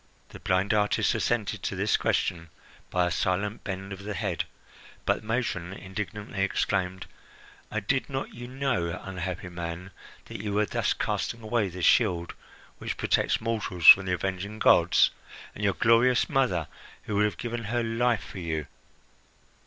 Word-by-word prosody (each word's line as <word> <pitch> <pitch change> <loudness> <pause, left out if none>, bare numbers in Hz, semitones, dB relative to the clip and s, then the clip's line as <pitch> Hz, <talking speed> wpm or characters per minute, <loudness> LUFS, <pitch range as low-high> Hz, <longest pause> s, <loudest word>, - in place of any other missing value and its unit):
The - - -11
blind 95 +2 +1
artist 105 -1 +2
assented - - -1
to - - -3
this - - +2
question 85 -1 0 0.4
by 90 -1 +2
a 90 - -1
silent 100 +5 -1
bend 95 0 -5
of 95 - -9
the 105 +1 -5
head; 100 -7 -2 0.6
but - - +1
the 110 - -14
matron 110 -6 -2
indignantly 100 +1 -5
exclaimed: 95 -1 0 0.6
"And 110 -1 -3
did 135 +6 0
not 135 0 -4
you 120 +1 -8
know, 125 -11 -1
unhappy 90 -2 -5
man, 85 +2 -6 0.3
that - - -7
you 105 -1 -3
were 105 +1 +2
thus - - 0
casting 115 -1 -2
away 110 -2 0
the 90 0 -7
shield 90 -7 +3 0.5
which - - -4
protects - - +1
mortals 110 -6 -3
from 95 0 +10
the 90 - +1
avenging 95 +3 -3
gods? - - +5 0.4
And - - -7
your - - +2
glorious 115 +2 +4
mother, 125 - +1 0.4
who 105 - -2
would 105 - +4
have 105 -4 -2
given 120 -1 -4
her 120 +2 0
life 115 +1 +1
for 95 - -9
you? 80 -3 -3
100 Hz, 160 wpm, -27 LUFS, 90-115 Hz, 0.6 s, from